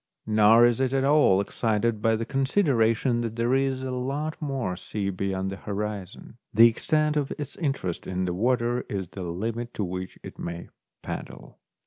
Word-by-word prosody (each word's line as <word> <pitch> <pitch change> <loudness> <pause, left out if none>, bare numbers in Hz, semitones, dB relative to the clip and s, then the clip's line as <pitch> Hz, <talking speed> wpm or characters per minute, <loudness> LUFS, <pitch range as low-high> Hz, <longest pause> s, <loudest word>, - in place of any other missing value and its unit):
Nor 110 +2 +6
is 120 0 +2
it 130 0 +1
at 135 -1 +2
all 140 -9 +5
excited 110 +1 0
by 115 0 +3
the 115 +1 -3
con 135 +2 -1
sideration 120 - +2
that 115 -1 -3
there 120 +2 +1
is 135 -1 +1
a 130 - -3
lot 140 +5 -2
more 135 -11 -2
sea 100 +2 -3
beyond 95 0 -2
the 100 - -6
horizon; 105 +2 -5
the 115 +2 +8
extent 150 +6 +1
of 145 -2 0
its 145 -2 -6
interest 135 - -2
in 95 0 -1
the 90 - -1
water 120 +4 +1
is 95 -4 -3
the 95 - -8
limit 115 +7 -4
to 105 - -1
which 90 0 -5
it - - -10
may 85 0 -6 0.3
paddle. - - -7
115 Hz, 180 wpm, -26 LUFS, 100-130 Hz, 0.3 s, the